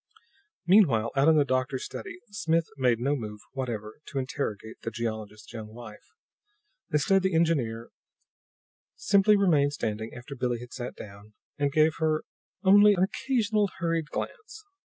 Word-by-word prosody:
Meanwhile, 145 - +4
out 135 +2 +3
in 160 -1 +6
the 145 - +4
doctor's 130 0 -1
study, 365 -3 -7
Smith 165 -6 +1
had 140 - -13
made 120 -3 +3
no 140 +4 +1
move 105 -5 -6
whatever 115 -5 -5
to 140 - -6
interrogate 130 -5 -4
the - - -3
geologist's 110 -2 -5
young 110 -1 -8
wife. 115 -3 -11 0.8
Instead, 190 +6 +3
the 190 -2 0
engineer 130 -9 0 1.0
simply 205 +1 +4
remained 150 -8 +3
standing 110 -3 -3
after 120 +3 -9
Billie 125 -2 -1
had 120 0 -10
sat 125 -1 -6
down, 105 +1 -12 0.2
and 145 -1 +1
gave 155 +1 +3
her 155 -1 +1 0.4
only 205 +2 +7
an 180 - +2
occasional 215 -1 0
hurried 165 -3 -1
glance. 440 -1 -6
140 Hz, 150 wpm, -27 LUFS, 115-175 Hz, 1.0 s, only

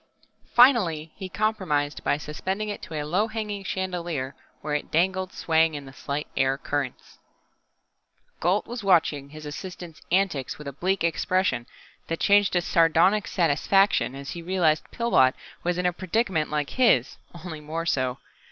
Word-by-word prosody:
Finally 185 - +5
he 190 -2 -7
compromised 180 -9 -1
by - - +1
suspending 190 +8 -4
it 205 - -5
to 160 - -8
a 150 -1 -2
low 185 +8 +1
hanging 210 -3 -4
chandelier, 175 -8 -3 0.3
where 150 0 -3
it 150 - -2
dangled 185 +3 +1
swaying 160 -1 +2
in 145 -1 -6
the 135 - -12
slight 140 +2 -4
air 135 0 +2
currents. 140 -2 -4 1.2
Gault 185 +5 +1
was 240 -2 -6
watching 160 -7 +2
his 155 +1 -10
assistant's 170 +2 -8
antics 180 -8 +1
with 150 - -9
a 140 - -5
bleak 185 +7 -1
expression 170 -6 0 0.4
that 165 - -3
changed 205 -1 +4
to 175 - +3
sardonic 170 +5 +3
satisfaction 180 -1 +2
as 140 0 -7
he 170 - -6
realized 170 -3 +1
Pillbot 180 - +3 0.3
was 175 0 0
in 180 - -1
a 180 - +2
predicament 185 -3 0
like 150 -1 -2
his 220 - +3 0.3
only 160 -4 -6
more 160 +2 -4
so. 130 -5 0
170 Hz, 155 wpm, -25 LUFS, 150-190 Hz, 1.2 s, Finally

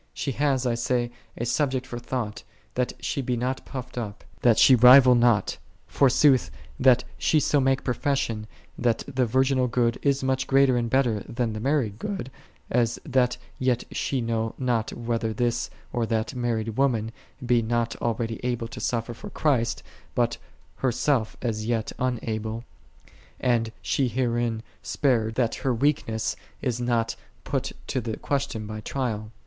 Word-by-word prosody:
She 140 - -2
hath, 135 -1 +1
I 120 - +2
say, 120 0 0 0.3
a 120 - -2
subject 130 0 0
for 120 -2 -6
thought, 115 -3 -4 0.3
that 125 0 -1
she 140 - -1
be 125 -1 -1
not 130 +2 -2
puffed 125 -1 -6
up, 105 -2 -6 0.2
that 115 -3 +5
she 135 - +7
rival 125 +1 +9
not; 120 -3 +3 0.3
forsooth 135 0 +4 0.3
that 125 -1 +5 0.2
she 155 - +3
so 145 0 +2
make 135 0 +2
profession 125 -4 -1 0.3
that 120 -2 +1
the 130 -3 0
virginal 130 +1 +2
good 120 -1 +1
is 140 -1 +1
much 130 0 0
greater 135 -1 +4
and 120 -1 0
better 120 -4 +2
than 120 -2 -1
the 110 - -4
married 120 -4 0
good, 195 - -4 0.4
as 120 -1 +2
that 125 -4 +2 0.2
yet 125 -2 +1
she 135 -3 -1
know 115 -1 -1
not 120 -4 0
whether 115 -1 -2
this 120 0 0 0.2
or 120 -2 0
that 110 +2 -1
married 115 -3 -2
woman 115 -5 +1 0.3
be 120 -1 +3
not 115 +1 0
already 115 -1 -2
able 120 -2 -1
to 120 - -8
suffer 115 +1 -2
for - - -9
Christ, 130 -7 0 0.3
but - - +1 0.4
herself 130 -2 0
as 110 -2 -2
yet 115 -2 -1
unable, 115 -2 -2 0.8
and 115 -3 +1
she 135 - +1
herein 120 -2 -1 0.2
spared, 115 -6 +1
that 120 -3 +1
her 130 -3 +1
weakness 115 -4 0 0.2
is 120 -1 -2
not 120 -2 0 0.3
put - - -2
to 130 - -2
the 110 -1 -4
question 140 -6 -2
by 110 0 -6
trial. 110 -4 -3
120 Hz, 155 wpm, -26 LUFS, 115-130 Hz, 0.8 s, rival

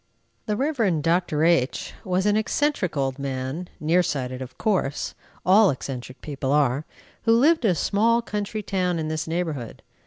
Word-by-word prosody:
The 210 - 0
Rev. 225 - +1
Dr. 165 -2 +1
H 165 -6 +1
was 185 +1 0
an 210 0 +3
eccentric 220 - 0
old 135 0 -1
man, 135 +5 -3
near 165 +4 +3
sighted 130 -6 -3
of 130 - -8
course, 185 -9 0 0.3
all 195 +2 +6
eccentric 130 -1 -5
people 140 -2 -3
are, 145 0 +2 0.4
who 225 - +5
lived 305 +1 +4
in - - +5
a 180 - +2
small 225 +7 +2
country 210 0 -3
town 180 -3 0
in 155 -1 -2
this 155 0 -3
neighborhood. 160 -8 -3
170 Hz, 160 wpm, -24 LUFS, 140-205 Hz, 0.4 s, all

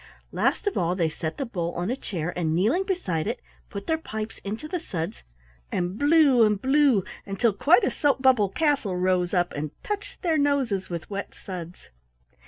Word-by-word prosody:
Last - - 0
of 410 - 0
all 175 +1 +1
they 170 -3 +1
set 160 +1 -5
the 275 - -2
bowl 175 -7 -3
on 175 +6 -1
a - - 0
chair, 175 - -4
and 160 -3 0
kneeling 235 - +2
beside 190 - -1
it 240 +3 -2 0.3
put 200 -1 -6
their 320 0 0
pipes 220 -7 -6
into 215 +9 -5
the 360 +3 -2
suds, 165 - -5 0.5
and 180 +1 -1
blew 290 -2 +5
and 210 -2 +3
blew 265 -4 +4 0.2
until 200 +3 +1
quite 320 - +4
a - - +2
soap 285 -2 +1
bubble 255 -7 +4
castle 275 - +1
rose 180 -1 +1
up 175 -2 +1
and 150 +1 -3
touched 415 -1 -5
their 325 -3 +2
noses 270 -9 +1
with 170 -2 -5
wet 200 0 -5
suds. 180 -2 -8
205 Hz, 190 wpm, -26 LUFS, 180-285 Hz, 0.5 s, blew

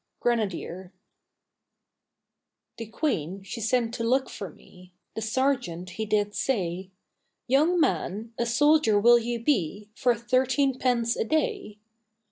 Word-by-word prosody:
GRENADIER 190 -6 -2 1.9
The 230 - -6
Queen 195 - -2
she 215 +4 -7
sent 230 +1 0
to 230 - -3
look 260 +3 +1
for 195 -3 -6
me, 180 +3 -18 0.2
The 220 - -5
sergeant 220 -7 -1
he 220 +5 -4
did 205 -1 0
say, 190 -8 -2 0.6
'Young 305 +8 +3
man, 210 - -1
a 235 - 0
soldier 290 -3 +4
will 240 +3 +6
you 235 0 -3
be 205 - 0
For 245 +1 +2
thirteen 260 +3 +1
pence 235 -2 +1
a - - 0
day?' 315 - -1
230 Hz, 125 wpm, -26 LUFS, 200-260 Hz, 1.9 s, will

